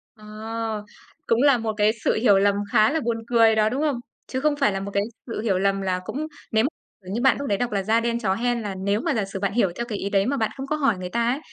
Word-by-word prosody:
Ờ. 215 0 -5 0.4
Cũng 230 +1 +3
là 280 -3 +5
một 225 -1 -2
cái 210 0 +4
sự - - +3
hiểu 210 -3 +4
lầm 200 0 +3 0.2
khá 215 +5 +5
là 320 - +1
buồn 235 -5 -1
cười 230 -2 +5
đó, 215 0 +3
đúng 265 +6 -2
không? 290 -6 0 0.3
Chứ 260 - -3
không 300 0 +2
phải 275 -7 +2
là 195 - -2
một 200 +1 -5
cái 200 0 +2 0.2
sự 225 - -4
hiểu 195 -5 +1
lầm 195 0 +1
là 185 -1 -1
cũng 305 +3 -4 0.2
nếu 220 0 +3
m - - +3 0.4
kiểu 185 - -8
như 235 - -1
bạn 265 - +4
lúc 280 - -3
đấy 200 - +1
đọc 245 +1 -2
là 195 -2 0
"Da 220 +3 +3
đen 235 0 -1
chó 190 -5 +1
hen" 240 +2 0
là 205 -2 -4
nếu 200 +3 0
mà - - 0
giả 215 -4 0
sử 195 0 -6
bạn 200 0 -1
hiểu 200 -7 +2
theo 235 - -3
cái 220 -4 -4
ý 200 - -3
đấy 195 -1 +2
mà 275 +2 0
bạn 220 - 0
không 270 0 -5
có 300 - 0
hỏi 275 -9 +1
người 180 0 -5
ta 235 +2 0
ấy, 275 - -2
220 Hz, 300 wpm, -24 LUFS, 200-245 Hz, 0.4 s, là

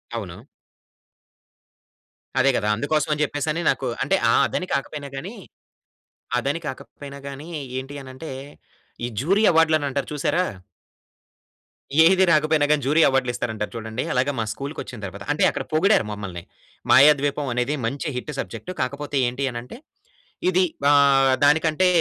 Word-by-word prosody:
అవును. 105 +1 -7 1.9
అదే 135 +2 +4
కదా! 105 - -1
అందుకోసం 155 +8 0
అని 150 - -2
చెప్పేసి 145 +1 -2
అని 165 +3 -2
నాకు 130 - 0 0.2
అంటే, 195 - +2
ఆహ్, - - +4
అదని 185 - -3
కాకపోయినా 140 +1 -3
గాని, 185 +12 -6 1.0
అదని 140 +6 -1
కాకపోయినా 140 +1 -8
గాని 140 +3 -8 0.3
ఏంటి 135 +2 -8
అనంటే, 130 +4 -9 0.7
ఈ - - -2
జ్యూరీ 195 +8 +2
అవార్డ్‌లు 160 -1 +4
అని 145 - -2
అంటారు 140 +1 -3
చూసారా... 170 +5 0 1.6
ఏది 190 +2 +5
రాకపోయినా 155 -1 +3
గాని, 150 -1 +3
జ్యూరీ 150 +4 +3
అవార్డ్‌లు 130 -2 +1
ఇస్తారంటారు 110 -3 -3
చూడండి. 110 +1 -4
అలాగే 130 +3 +1
మా 110 - 0
స్కూల్‌కొచ్చిన 140 -3 -7
తర్వాత, 100 +1 -8
అంటే 145 - +1
అక్కడ - - -4
పొగిడారు 185 - +3
మమ్మల్ని. 95 -4 -6 0.5
మాయాద్వీపం 145 0 +5
అనేది 125 +4 0
మంచి 140 +7 -3
హిట్ 125 +4 -4
సబ్జెక్ట్. 185 - -6
కాకపోతే 140 +2 -3
ఏంటి 125 +3 -3
అనంటే, 120 - -8 0.7
ఇది 185 +1 +3 0.3
ఆహ్, 140 -2 +5
దానికంటే 160 +4 +3
140 Hz, 135 wpm, -23 LUFS, 125-155 Hz, 1.9 s, ఏది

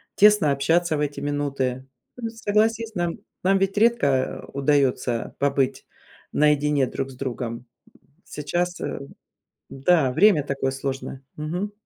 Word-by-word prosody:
тесно 210 -8 +5
общаться 160 +4 +2
в 150 - -1
эти 145 -1 -2
минуты. 140 -3 -2 0.3
Ну, 230 -2 -4
согласись, 225 0 0
нам 175 -1 -2 0.2
нам 195 +1 +3
ведь 195 +1 0
редко, 175 - +2
а, - - -11
удаётся 135 -4 +1
побыть 135 -1 0 0.5
наедине 150 -2 +3
друг 135 - -4
с 130 - -12
другом. 125 -3 -4
М, 120 +2 -12 0.6
сейчас, 175 +5 -3
эм 140 - -5 0.6
н-да, 135 -1 +2
время 195 -4 +5
такое 135 -1 -1
сложное. 135 0 -5
Мгм. 175 +7 -3
145 Hz, 130 wpm, -24 LUFS, 135-180 Hz, 0.6 s, тесно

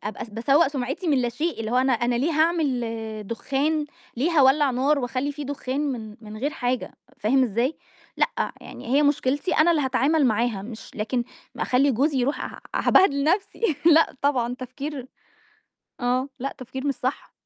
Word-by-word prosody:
آآ، - - -1
أبقى - - -6
باسوَّء 270 +8 +3
سُمعِتي 275 +5 -4
من 280 -4 +3
لا 240 - +1
شيء، 300 +5 -3
اللي 220 0 -3
هو 250 - +1
أنا 260 +1 +3
أنا 240 0 +1
ليه 265 +7 +1
هاعمل 310 -6 +1 0.4
دخان 285 +7 -1 0.3
ليه 280 +8 +1
هاولّع 285 -2 +4
نار، 275 +4 +2
وأخلّي 255 +2 -2
في 290 +1 -6
دخان، 275 -1 -3
من 220 -4 -7
من 215 -1 -9
غير 275 +6 -1
حاجة 250 -3 -2 0.3
فاهم 260 +6 +3
إزاي؟ 245 +5 0 0.4
لأ، - - 0
يعني - - -10
هي 295 - +5
مشكلتي 285 +2 +1
أنا 315 +3 +5
اللي 315 -3 +2
هاتعامل 270 +3 +2
معاها، 225 -3 0
مش 225 +1 -9
لكن 235 +3 -1 0.3
أخلّي 270 +3 +2
جوزي 275 +3 +1
يرُوح 265 +4 0
ه - - -8 0.2
هابهدِل 280 -8 +4
نفسي 360 0 0
لأ، 325 -1 +5
طبعًا 250 -4 +1
تفكير 260 +1 -6 0.9
آه، 250 +2 0
لأ 275 +2 -4
تفكير 260 +2 -6
مش 280 - +1
صح. 255 +2 -4
265 Hz, 170 wpm, -24 LUFS, 245-295 Hz, 0.9 s, هي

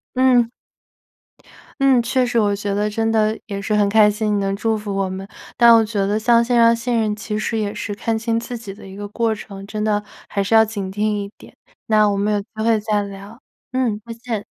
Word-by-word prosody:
嗯。 250 -2 +4 1.3
嗯， 265 -2 +5
确 255 +2 +1
实， 245 -1 -1
我 205 -2 +2
觉 200 0 -3
得 210 +1 0
真 225 +1 -1
的 220 -1 +2
也 200 -2 -4
是 200 +2 -2
很 205 -1 +3
开 215 0 +6
心， 210 0 -1
你 - - +1
能 195 0 -1
祝 220 +2 0
福 205 -2 -5
我 195 -1 -1
们。 190 +1 -6 0.3
但 235 -1 +7
我 225 - +5
觉 210 -2 -1
得 205 +2 0
像 235 +1 +4
线 245 +1 0
上 230 0 +5
信 240 +1 -2
任， 215 -2 +1
其 210 0 -4
实 225 +1 -2
也 210 -1 -2
是 205 - -5
看 225 +2 -2
清 230 0 0
自 245 +1 -6
己 225 -4 -8
的 195 0 -12
一 190 - -10
个 205 0 -6
过 225 +2 0
程， 200 -2 -9
真 210 +1 -4
的 210 -1 0 0.3
还 200 - -1
是 195 - -2
要 220 0 +7
警 205 -3 -4
惕 205 +2 -5
一 205 -2 -1
点， - - -15 0.3
那 215 -1 +4
我 200 - +1
们 205 +1 0
有 - - +1
机 200 - -8 0.2
会 225 -1 +3
再 210 -1 0
聊， 200 +4 -9 0.3
嗯， 250 -5 0
再 230 - -7
见。 230 -3 -5
215 Hz, 255 characters per minute, -20 LUFS, 205-230 Hz, 1.3 s, 但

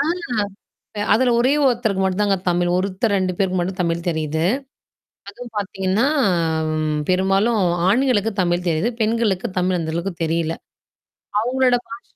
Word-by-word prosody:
ஆ. - - +2 0.9
இப்ப 205 -1 -2
அதுல 245 +1 +3
ஒரே 255 +3 +3
ஒருத்தருக்கு 225 -6 +1
மட்டும் 190 +2 0
தாங்க 200 -1 +2
தமிழ். 175 0 +1
ஒருத்தர், 195 +3 -1
2 185 -1 0
பேருக்கு 185 -1 0
மட்டும் 185 +2 -3
தமிழ் 170 0 -2
தெரியுது. 160 -1 -1 0.9
அதுவும் 245 -2 -10
பார்த்தீங்கன்னா 195 +3 0 0.7
ம் 155 -1 -1
பெரும்பாலும் 195 +4 +2 0.3
ஆண்களுக்கு 225 -1 +2
தமிழ் 175 0 -1
தெரியுது. 170 +8 +1
பெண்களுக்கு 220 -4 +1
தமிழ் 180 0 +1
அந்த 160 -1 -3
அளவுக்கு 175 +3 -2
தெரியல. 165 0 -1 0.9
அவுங்களோட 250 +1 +2
பாஷ 230 +1 -9
190 Hz, 140 wpm, -21 LUFS, 175-225 Hz, 0.9 s, அதுல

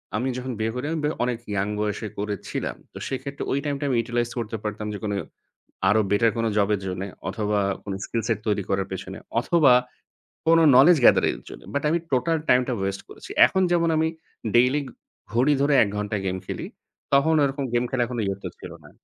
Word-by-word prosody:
আমি 125 +5 0
যখন 130 0 -4
বিয়ে 110 +1 0
করি 125 +3 -3
আমি 165 - -1 0.2
অনেক 125 -1 -1
ইয়ং 100 0 0
বয়সে 105 +1 -2
করেছিলাম। 105 -2 -3 0.2
তো - - -9
সেক্ষেত্রে 140 +1 -4
ওই 135 - +1
টাইমটা 145 0 -2
আমি 130 - +1
ইউটিলাইজ 120 +1 -1
করতে 115 -1 -4
পারতাম 105 0 -4
যে - - -4
কোনো 105 -1 -1 0.7
আরো 110 +2 +4
বেটার 110 +2 +4
কোনো 115 0 +1
জব 100 -1 +3
এর 100 - -2
জন্যে 95 +1 -3 0.2
অথবা 105 +1 -1 0.3
কোনো 95 -1 -4
স্কিল 115 -1 -2
সেট 110 -3 +1
তৈরি 105 -1 +1
করার 95 0 0
পেছনে 95 - -6 0.2
অথবা 145 -2 +4 0.8
কোনো 165 0 +6
নলেজ 155 +6 +7
গেদারিং - - +5
এর - - -22
জন্য। - - -10
বাট 140 - -1
আমি 170 - +2
টোটাল 145 +6 +2
টাইম 125 - +6
টা 125 - 0
ওয়েস্ট 95 0 -2
করেছি। - - -12 0.2
এখন 190 - +1
যেমন 170 -1 +3
আমি 160 0 +2 0.5
ডেইলি 130 +5 +4 0.5
ঘড়ি 130 +5 +4
ধরে 145 0 +3
১ - - -1
ঘণ্টা 105 0 -2
গেম 95 0 -1
খেলি - - -5 0.5
তখন 155 +4 +4
ওরকম 140 0 -1
গেম 120 +1 +2
খেলা 130 -2 0
এখনো 120 -3 -3
ইয়ত্তা 100 0 -3
ছিল - - -9
না। - - -14
120 Hz, 200 wpm, -24 LUFS, 105-140 Hz, 0.8 s, নলেজ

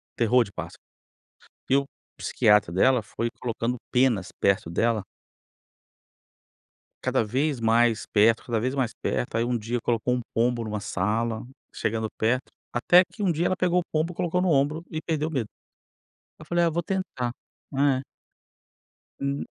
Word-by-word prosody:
terror 120 +2 +4
de 100 - -12
pássaro, - - -7 0.9
e 135 - +4
o 140 0 +2 0.3
psiquiatra 105 -5 +3
dela 125 +7 +4
foi 115 +2 -3
colocando 120 0 -1 0.2
penas 125 -7 +2
perto 100 -3 +2
dela 110 +4 +1 2.0
cada - - +1
vez 135 +4 0
mais 115 0 +3
perto, 110 +2 +3
cada 115 -3 0
vez 130 +4 -1
mais 130 -4 0
perto. 120 - -2
Aí, 115 - +2
um 120 0 0
dia, 115 +2 -2
colocou 120 +1 0
um 125 - -2
pombo 120 0 +1
numa 105 -1 -3
sala, 110 +4 -1 0.3
chegando 110 0 -1
perto, 125 +4 0 0.2
até 175 +9 +6
que 210 - -5
um 180 - +3
dia 165 +2 0
ela 185 - +1
pegou 180 0 +2
o - - -2
pombo, 160 +3 0
colocou 175 +1 0
no 185 - +2
ombro 150 +2 +2
e 155 0 -3
perdeu 155 -1 -1
o - - -9
medo. 130 -7 -1 0.9
Aí 155 - -10
eu - - -16
falei: 175 +2 +1
“Ah, - - +3
vou 170 +2 -2
tentar.” 165 -11 -2 0.5
Eh. 135 -2 +3 1.2
Hum. 140 0 -2
125 Hz, 160 wpm, -26 LUFS, 115-150 Hz, 2.0 s, até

